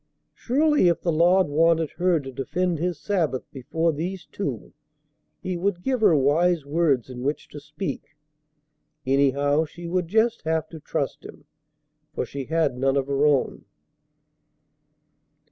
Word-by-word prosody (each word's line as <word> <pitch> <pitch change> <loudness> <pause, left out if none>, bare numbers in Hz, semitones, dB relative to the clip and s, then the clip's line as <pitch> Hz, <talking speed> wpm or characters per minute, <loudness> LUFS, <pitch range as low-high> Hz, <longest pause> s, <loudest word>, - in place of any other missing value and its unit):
Surely, 295 - +2
if 170 - +2
the 170 - 0
Lord 175 +4 +4
wanted 160 +1 +2
her 180 -2 +2
to 135 -2 -8
defend 160 +6 -2
His 175 -2 -2
Sabbath 165 -10 -1
before 160 +5 -1
these 175 +4 -5
two, 140 - -5 0.7
He 185 -1 -2
would 180 0 -2
give 260 -3 -1
her 175 - +5
wise 155 +3 +2
words 145 -5 +1
in 125 -1 -8
which 145 +4 -2
to 145 - -9
speak. 150 +3 -6 0.9
Anyhow, 140 +3 +2
she 170 +3 -11
would 175 0 -1
just 220 +5 +1
have 160 0 -1
to 160 - -9
trust 140 -2 -3
Him, 145 - -12 0.7
for - - -1
she 140 -1 -6
had 160 -5 0
none 135 +1 +2
of 135 - 0
her 140 +1 +2
own. 145 -3 0
160 Hz, 145 wpm, -24 LUFS, 140-180 Hz, 0.9 s, her